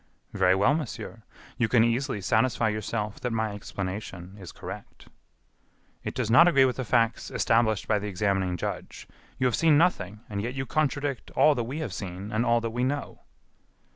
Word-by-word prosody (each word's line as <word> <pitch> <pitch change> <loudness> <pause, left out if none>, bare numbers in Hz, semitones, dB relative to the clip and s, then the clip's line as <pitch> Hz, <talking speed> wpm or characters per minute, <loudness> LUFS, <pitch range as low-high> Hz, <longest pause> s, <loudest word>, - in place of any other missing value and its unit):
"Very 95 -2 +3
well, 100 +9 +3
monsieur, 150 -6 -5 0.4
you 120 - +3
can 115 -1 +4
easily 120 -1 0
satisfy 110 +2 +2
yourself 105 0 -3
that 125 - -2
my 110 -1 -1
explanation 95 -2 -6
is 90 -3 -9
correct." - - -10 0.9
"It - - -5
does 115 -3 -1
not 165 +8 +8
agree 135 -6 +5
with 125 - -1
the 130 - -2
facts 115 -1 +1
established 115 -2 +1
by 105 -2 +2
the 105 - -5
examining 95 -2 0
judge. - - -6 0.3
You 130 - 0
have 125 - +2
seen 160 -3 +4
nothing, 110 - +1
and 100 -1 -3
yet 120 +4 -4
you 135 0 -2
contradict 145 -3 -1
all 155 - +6
that 120 -4 -2
we 130 +6 -5
have 120 -12 -4
seen 95 +2 -6
and 110 +2 +1
all 120 0 +4
that 115 -1 -3
we 120 +2 -1
know." 140 +3 -2
115 Hz, 185 wpm, -27 LUFS, 100-130 Hz, 0.9 s, not